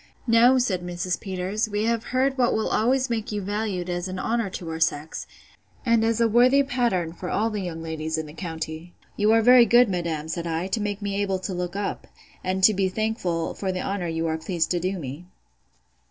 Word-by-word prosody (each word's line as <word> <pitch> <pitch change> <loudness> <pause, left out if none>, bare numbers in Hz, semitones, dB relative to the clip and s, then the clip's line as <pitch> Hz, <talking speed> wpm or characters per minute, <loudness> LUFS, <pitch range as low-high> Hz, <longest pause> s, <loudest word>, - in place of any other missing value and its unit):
No, 240 +2 +5
said 210 -8 0
Mrs. 175 0 -3
Peters, 190 +3 -2
we 205 0 -1
have 230 0 0
heard 265 +1 +1
what 250 -2 +2
will 220 - 0
always 255 +4 +2
make 225 -3 -3
you 210 - -2
valued 200 -2 -2
as 175 0 -2
an 185 0 -5
honour 225 +1 -1
to 180 -2 -7
our 160 - -4
sex, 155 -1 -1 0.6
and 230 -2 +3
as 225 0 +1
a 230 - +4
worthy 250 +5 +5
pattern 235 -11 0
for 180 +1 -6
all 225 +2 0
the 210 -1 -3
young 165 -3 -5
ladies 160 0 -3
in 160 - -3
the 150 - -11
county. 160 0 -6 0.2
You 210 +1 +3
are 225 0 +4
very 245 0 +7
good, 240 +1 +6
madam, 170 -4 -2
said 170 +1 -3
I, 165 +2 -1
to 215 - -1
make 205 0 -3
me 200 0 -1
able 195 -2 0
to 185 - -4
look 180 +1 -4
up, 200 0 -3 0.4
and 185 +1 -1
to 215 - +7
be 190 -1 +1
thankful 185 -5 -2
for 190 -2 -3
the 185 0 -3
honour 195 -3 -2
you 165 0 -2
are 160 0 -1
pleased 165 0 -1
to 175 - +1
do 185 +3 -2
me. 150 +3 -7
190 Hz, 220 wpm, -25 LUFS, 175-225 Hz, 0.6 s, very